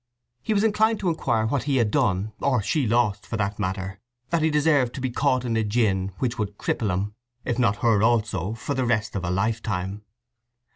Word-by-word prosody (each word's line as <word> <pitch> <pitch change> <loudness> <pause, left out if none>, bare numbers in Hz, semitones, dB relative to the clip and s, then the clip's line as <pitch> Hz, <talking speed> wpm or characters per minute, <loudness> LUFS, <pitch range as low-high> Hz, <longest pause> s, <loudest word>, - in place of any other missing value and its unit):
He 215 - -1
was 200 - +3
inclined 220 0 +2
to 185 - +1
inquire 120 -9 0
what 130 +4 -1
he 140 -2 +1
had 115 -4 +2
done, 100 +2 +1
or 135 -3 +2
she 140 +3 0
lost, 110 -3 +1
for 110 - -3
that 100 0 -2
matter, 95 0 -3 0.3
that 170 -1 +2
he 160 - +3
deserved 145 -5 +2
to - - -5
be 130 -1 -2
caught 130 -1 +1
in 115 -2 -1
a 110 - +2
gin 100 -3 +1
which 120 -3 -2
would 105 -1 -3
cripple 110 - -1
him, 100 +3 -2 0.3
if 120 0 -1
not 105 -4 +1
her 110 -4 +4
also, 110 -3 +1
for 125 +5 -4
the 135 -1 0
rest 110 -3 0
of 95 - -2
a 85 - -2
lifetime? 100 0 -1
115 Hz, 210 wpm, -25 LUFS, 100-130 Hz, 0.3 s, her